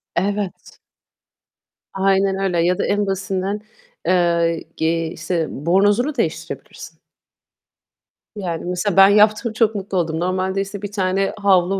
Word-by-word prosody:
Evet. 200 Hz, +1 st, -3 dB, 1.1 s
Aynen 195 Hz, 0 st, +2 dB
öyle. 185 Hz, -3 st, 0 dB
Ya 180 Hz, +1 st, +2 dB
da -, -, 0 dB
en 205 Hz, 0 st, +1 dB
basitinden, 195 Hz, +1 st, -2 dB, 0.4 s
eee, 170 Hz, -2 st, +2 dB
giy 165 Hz, 0 st, 0 dB
işte, 170 Hz, 0 st, -2 dB
bornozunu 205 Hz, -, +1 dB
değiştirebilirsin. 165 Hz, -10 st, -5 dB, 1.4 s
Yani, 175 Hz, -5 st, -4 dB
mesela 180 Hz, +2 st, -1 dB
ben 195 Hz, 0 st, +9 dB
yaptım, 215 Hz, +2 st, +3 dB
çok 220 Hz, -1 st, +2 dB
mutlu 195 Hz, -1 st, -3 dB
oldum. 160 Hz, -2 st, -1 dB
Normalde, 185 Hz, +2 st, -1 dB
işte, 195 Hz, 0 st, -6 dB
bir 205 Hz, 0 st, -5 dB
tane 195 Hz, -1 st, 0 dB
havlu 195 Hz, -1 st, +3 dB
190 Hz, 120 wpm, -20 LUFS, 175-205 Hz, 1.4 s, ben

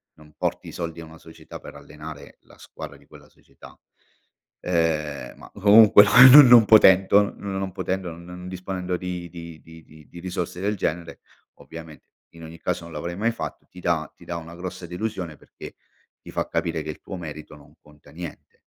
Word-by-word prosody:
non 75 Hz, 0 st, -19 dB
porti -, -, -3 dB
i -, -, -9 dB
soldi 85 Hz, -1 st, -6 dB
a 80 Hz, -, -9 dB
una 80 Hz, 0 st, -15 dB
società 80 Hz, -, -13 dB
per -, -, -12 dB
allenare 75 Hz, -2 st, -12 dB
la -, -, -21 dB
squadra -, -, -11 dB
di -, -, -24 dB
quella -, -, -17 dB
società. -, -, -18 dB, 0.8 s
Ehm, 75 Hz, -7 st, -2 dB
ma -, -, -15 dB
comunque 105 Hz, +1 st, +7 dB, 0.3 s
non 145 Hz, -1 st, +10 dB
non 120 Hz, -2 st, +8 dB
potento 100 Hz, -1 st, +5 dB
non 95 Hz, -1 st, -5 dB
potendo, 95 Hz, -1 st, -4 dB
n 85 Hz, +1 st, -13 dB
non 90 Hz, +1 st, -10 dB
disponendo 90 Hz, 0 st, -5 dB
di 90 Hz, -1 st, -6 dB
di 85 Hz, -1 st, -11 dB
di 80 Hz, +1 st, -15 dB
di 75 Hz, -2 st, -18 dB
di 85 Hz, -, -12 dB
risorse 90 Hz, 0 st, -5 dB
del 105 Hz, +1 st, -1 dB
genere, 85 Hz, -1 st, -4 dB, 0.4 s
ovviamente 80 Hz, -2 st, -12 dB, 0.2 s
in 85 Hz, 0 st, -15 dB
ogni 80 Hz, +1 st, -11 dB
caso -, -, -3 dB
non 85 Hz, -, -12 dB
l'avrei 85 Hz, +3 st, -6 dB
mai 115 Hz, +3 st, 0 dB
fatto, 115 Hz, -, -8 dB
ti 90 Hz, -, -14 dB
dà 80 Hz, -4 st, -1 dB
ti -, -, -18 dB
dà 85 Hz, -, -5 dB
una 85 Hz, +1 st, -10 dB
grossa 90 Hz, 0 st, -8 dB
delusione 90 Hz, -2 st, -5 dB
perché -, -, -13 dB, 0.5 s
ti -, -, -12 dB
fa -, -, -3 dB
capire 80 Hz, -2 st, -2 dB
che 80 Hz, -, -8 dB
il 75 Hz, -, -8 dB
tuo 95 Hz, -, -8 dB
merito 75 Hz, -3 st, -9 dB
non 70 Hz, -1 st, -19 dB
conta 75 Hz, 0 st, -20 dB
niente 85 Hz, 0 st, -11 dB
85 Hz, 190 wpm, -23 LUFS, 80-95 Hz, 0.8 s, non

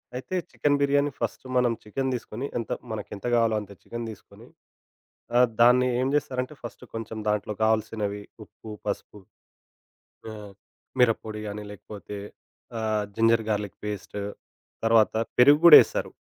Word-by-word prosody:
అయితే 130 Hz, +8 st, -5 dB, 0.2 s
chicken 145 Hz, -1 st, +1 dB
biryani 140 Hz, +1 st, +2 dB
first -, -, -4 dB
మనం 125 Hz, -1 st, +3 dB
chicken 130 Hz, +5 st, -2 dB
దీసుకొని 120 Hz, +1 st, -5 dB
ఎంత 115 Hz, -, -4 dB, 0.2 s
మనకేంత 105 Hz, -1 st, -6 dB
గావాలో 115 Hz, -2 st, +3 dB
అంత 100 Hz, -1 st, -12 dB
చికెన్ 120 Hz, 0 st, -6 dB
దీసుకొని, 110 Hz, -, -13 dB, 0.9 s
ఆహ్, 125 Hz, +1 st, +6 dB
దాన్ని 125 Hz, +1 st, +6 dB
ఏం 130 Hz, -, +1 dB
జేస్తారంటే 130 Hz, -1 st, -1 dB
ఫస్ట్ 120 Hz, -, -9 dB
కొంచెం 115 Hz, 0 st, -6 dB
దాంట్లో 105 Hz, 0 st, 0 dB
గావాల్సినవి 110 Hz, -2 st, 0 dB, 0.2 s
ఉప్పు, 110 Hz, -, -13 dB
పసుపు 105 Hz, 0 st, -5 dB, 1.1 s
ఆహ్, 105 Hz, -2 st, -10 dB, 0.5 s
మిరపొడి 110 Hz, -3 st, +1 dB
గాని 105 Hz, +1 st, -6 dB
లేకపోతే 105 Hz, 0 st, -9 dB, 0.6 s
ఆహ్, 110 Hz, -1 st, 0 dB
జింజర్ 115 Hz, 0 st, +3 dB
గార్లిక్ 105 Hz, -3 st, -2 dB
పేస్ట్. 105 Hz, 0 st, -5 dB, 0.7 s
తర్వాత 115 Hz, -1 st, +4 dB, 0.2 s
పెరుగు 145 Hz, +4 st, +7 dB
గూడా 170 Hz, -3 st, +12 dB
ఎస్తరు. -, -, -4 dB
110 Hz, 130 wpm, -26 LUFS, 105-125 Hz, 1.1 s, గూడా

